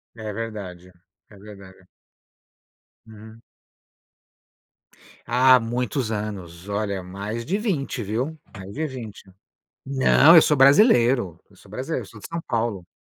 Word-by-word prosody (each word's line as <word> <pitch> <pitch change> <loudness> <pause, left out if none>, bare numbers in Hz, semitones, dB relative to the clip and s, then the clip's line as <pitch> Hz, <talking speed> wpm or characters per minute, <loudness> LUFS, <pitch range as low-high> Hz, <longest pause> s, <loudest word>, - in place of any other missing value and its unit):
É 110 -2 -6
verdade, 100 -5 -7 0.4
é 105 - -16
verdade. 95 -2 -14 1.2
Uhum. 110 +1 -14 1.8
Ah, 125 +2 +5
muitos 120 +1 -3
anos. 100 -5 -6
Olha, 100 -2 -2
mais 100 +5 -6
de 190 +9 -1
20, 160 - -3
viu? 125 +10 -3 0.2
Mais 100 0 -10
de 155 +2 -3
20. 120 -7 -9 0.6
Não, 140 +4 +5
eu 160 - +9
sou 150 - +2
brasileiro 130 - +4
eu 100 - -22
sou 100 - -20
brasileiro, 130 +3 -4
eu - - -15
sou 105 +2 -14
de - - -9
São 170 0 -4
Paulo. 110 -6 -2
110 Hz, 130 wpm, -23 LUFS, 100-130 Hz, 1.8 s, eu